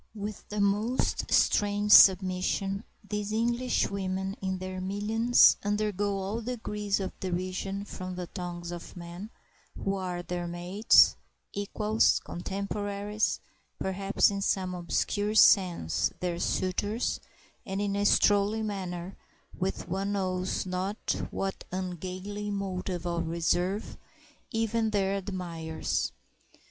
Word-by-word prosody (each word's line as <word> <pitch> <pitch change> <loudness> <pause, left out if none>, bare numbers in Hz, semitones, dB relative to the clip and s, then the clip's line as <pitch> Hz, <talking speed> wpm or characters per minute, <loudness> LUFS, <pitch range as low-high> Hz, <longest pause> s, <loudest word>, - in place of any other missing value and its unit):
With 210 0 -6
the 210 - -3
most 210 +5 0
strange 205 0 +3
submission 190 +1 +5 0.2
these 210 0 -3
Englishwomen 200 -5 0
in 190 -1 -1
their 185 0 -5
millions 215 +5 +4
undergo 205 -1 0
all 195 +4 -3
degrees 210 -4 -2
of 190 -1 -5
derision 185 +2 -3
from 185 -2 -6
the 180 0 -4
tongues 175 -1 -6
of 175 +2 -8
men 175 +4 -8 0.5
who 195 - -1
are 180 -2 -3
their 175 0 -3
mates, 175 +5 +4 0.4
equals, 210 +2 +2
contemporaries, 200 +3 -2 0.4
perhaps 195 +2 +2
in 200 0 -3
some 185 -2 0
obscure 180 - -1
sense 175 - +4
their 175 -1 -2
suitors, 205 +6 -1 0.4
and 195 +1 -4
in 200 -1 0
a 200 - 0
strolling 205 +2 +3
manner, 185 -3 -4 0.4
with 190 -2 -3
one 195 +3 -1
knows 185 -2 -1
not 185 +3 -2
what 195 0 -3
ungainly 185 +3 -4
motive 185 -3 -3
of 170 -1 -1
reserve, 175 +4 0 0.5
even 225 0 0
their 195 -2 +1
admirers. 175 -5 -3
195 Hz, 110 wpm, -29 LUFS, 185-205 Hz, 0.5 s, submission